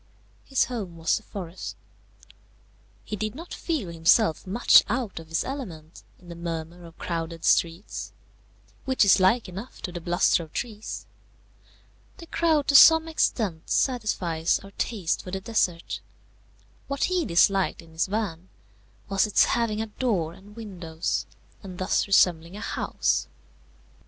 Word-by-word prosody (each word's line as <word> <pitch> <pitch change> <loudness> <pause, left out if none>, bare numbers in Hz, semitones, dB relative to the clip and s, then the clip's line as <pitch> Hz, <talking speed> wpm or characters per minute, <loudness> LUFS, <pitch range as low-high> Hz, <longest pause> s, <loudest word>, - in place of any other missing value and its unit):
His 270 - +2
home 200 -9 -6
was 165 0 +1
the - - -8
forest. 185 -4 -7 1.3
He 215 - -4
did 215 +2 -3
not 335 +4 -9
feel 300 - -3
himself 170 +2 +3
much 220 +6 +6
out 235 -6 -2
of 165 - -11
his 165 +1 -1
element 180 - -7 0.2
in 180 - -19
the 170 - -8
murmur 170 0 -6
of 165 0 -14
crowded 165 -1 -4
streets, 170 +4 0 0.7
which 260 -5 +3
is 195 - +6
like 200 +5 +3
enough 195 +7 -9
to 180 - -3
the 175 -1 -6
bluster 175 0 +2
of 160 -2 -11
trees. 220 -3 -5 1.1
The 340 - -10
crowd 320 -4 +1
to 280 - +3
some 320 +3 +9
extent 210 - -1
satisfies 185 -10 +1
our 195 - -12
taste 200 -5 -2
for - - -9
the 190 +1 -3
desert. 190 -5 -1 0.9
What 280 0 -2
he 365 -2 +1
disliked 190 - +2
in 165 - -18
his 160 +3 -1
van 190 -4 -3 0.6
was 195 +1 +2
its 210 - +4
having 220 -2 0
a - - -4
door 210 -8 -1
and 205 +4 -16
windows, 180 -7 -4 0.3
and 185 -3 -9
thus 185 +2 0
resembling 175 -2 +3
a - - -7
house. - - -1
195 Hz, 145 wpm, -26 LUFS, 170-230 Hz, 1.3 s, some